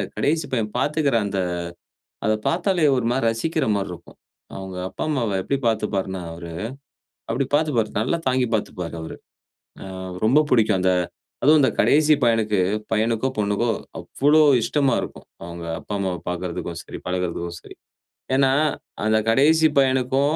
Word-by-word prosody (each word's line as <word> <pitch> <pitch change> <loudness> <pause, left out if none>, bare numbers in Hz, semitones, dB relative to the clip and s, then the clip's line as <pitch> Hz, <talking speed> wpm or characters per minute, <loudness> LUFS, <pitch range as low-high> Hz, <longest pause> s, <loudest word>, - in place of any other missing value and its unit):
கடேசி 155 +2 +1
பையன் 110 -3 -1
பார்த்துக்கிற 145 -4 +1
அந்த 100 -1 -2 0.9
அத 110 - +3 0.2
பாத்தாலே 175 -2 +2
ஒரு 120 -2 0
மாரி 130 -2 0
ரசிக்கிற 155 +8 -1
மாரி 100 -2 -3
இருக்கும். 85 - -13 0.4
அவங்க 95 -1 -7
அப்பா, 95 - -7
அம்மாவை 115 -9 0
எப்படி 140 - -1
பார்த்துப்பார்னா? 100 -4 -1
அவரு, 85 0 -8 0.8
அப்படி 125 +4 0
பார்த்துப்பாரு. 145 -8 +1
நல்லா 130 +9 0
தாங்கிப் 125 -2 +1
பார்த்துப்பாரு 90 -5 -3
அவரு. 80 - -7 0.7
ஆ - - -9 0.4
ரொம்ப 130 +7 +5
பிடிக்கும். 110 -5 +3
அந்த 95 0 +3 0.5
அதுவு 150 +2 +6
அந்த 130 - +4
கடேசி 155 +1 +5
பையனுக்கு 110 -4 +2 0.3
பையனுக்கோ, 110 +3 +1
பொண்ணுக்கோ 105 +3 0 0.3
அவ்வளோ 150 +3 +2 0.2
இஷ்டமா 140 +3 +1
இருக்கும். - - -8 0.2
அவங்க 85 0 -7
அப்பா, - - -7
அம்மாவ 95 -3 -2
பார்க்கதற்கும் 85 -1 -4
சரி, - - -9
பழகுறதுக்கும் 85 -1 -3
சரி. - - -13 0.6
ஏனா, 135 -1 +4 0.5
அந்த 110 0 +3
கடேசி 155 +7 +5
பையனுக்கு, 130 0 +3
115 Hz, 140 wpm, -23 LUFS, 95-140 Hz, 0.9 s, அதுவு